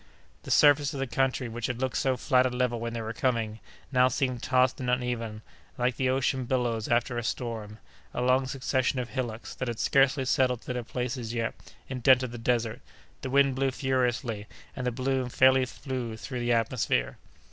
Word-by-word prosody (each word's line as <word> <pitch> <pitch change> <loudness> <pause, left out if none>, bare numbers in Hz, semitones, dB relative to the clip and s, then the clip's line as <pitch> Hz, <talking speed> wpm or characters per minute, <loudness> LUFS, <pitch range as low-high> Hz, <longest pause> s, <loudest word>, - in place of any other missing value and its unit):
The - - -10
surface 145 0 +5
of - - -4
the 135 - 0
country, 130 +1 0
which 115 0 -4
had 125 -2 -3
looked 130 -1 -1
so 130 -1 +1
flat 130 0 +3
and 125 -1 -4
level 125 -2 0
when 115 0 -4
they 115 - -3
were 110 +1 -4
coming, 115 -3 -1 0.3
now 130 -1 +5
seemed 130 -2 -1
tossed 130 -1 +2
and 125 -1 -2
uneven, 120 -3 -2 0.3
like 125 -1 +1
the 130 0 0
ocean 130 0 0
billows 120 -3 0
after 120 0 +1
a - - -5
storm; 110 -3 -4 0.3
a - - -4
long 130 +1 +3
succession 130 0 0
of 125 -2 -3
hillocks, 120 -4 -4
that 130 - -4
had 120 -2 -3
scarcely 135 +2 +3
settled 125 -2 +2
to 125 - -4
their 125 - -2
places 125 -1 -4
yet, 115 -1 -1 0.3
indented 130 -1 +3
the 120 - -7
desert; 115 0 0 0.4
the 130 - -4
wind 140 0 +4
blew 135 +1 +1
furiously, 125 -5 -1 0.3
and 125 -2 -3
the - - +1
balloon 130 +1 -1
fairly 130 +1 +5
flew 125 -4 -5
through 130 +1 -5
the 120 0 0
atmosphere. 115 - 0
125 Hz, 190 wpm, -28 LUFS, 115-130 Hz, 0.4 s, surface